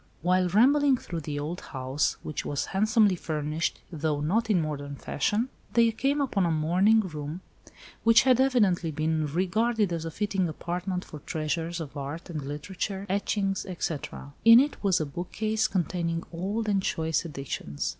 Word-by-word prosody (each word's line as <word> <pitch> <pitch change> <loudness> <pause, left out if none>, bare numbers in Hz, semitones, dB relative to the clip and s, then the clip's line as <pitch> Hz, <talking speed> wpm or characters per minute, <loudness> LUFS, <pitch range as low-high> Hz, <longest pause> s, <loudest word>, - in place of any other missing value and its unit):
While 180 +1 +3
rambling 265 +8 +4
through 170 -7 -5
the 145 -1 -4
old 155 +5 -4
house, 130 +1 -1
which 155 - -4
was 145 - -2
handsomely 215 0 +4
furnished, 155 -1 -2
though 155 -2 -1
not 215 +10 0
in 200 -4 +4
modern 145 -2 -3
fashion, 210 - -1 0.2
they 230 -1 +5
came 275 +6 0
upon 240 -9 +1
a 170 - +2
morning 180 +8 +3
room, 155 -2 -6 0.6
which 230 0 +6
had 260 -1 +4
evidently 210 -11 +2
been 155 0 0
regarded 200 +5 +1
as 165 -1 -3
a 165 - -3
fitting 195 0 -1
apartment 180 +3 -3
for 150 - -9
treasures 165 +3 -3
of 155 -3 -7
art 145 +5 -6
and 155 -3 -4
literature, 180 +7 -4
etchings, 195 0 0
etc. 155 -5 -5
In 230 +1 +9
it 285 -2 0
was 195 -3 +3
a 155 - -1
bookcase, 215 +8 -1
containing 170 -2 -1
old 200 +6 -2
and 200 -2 +2
choice 160 -3 0
editions. 135 - -4
175 Hz, 160 wpm, -27 LUFS, 155-210 Hz, 0.6 s, In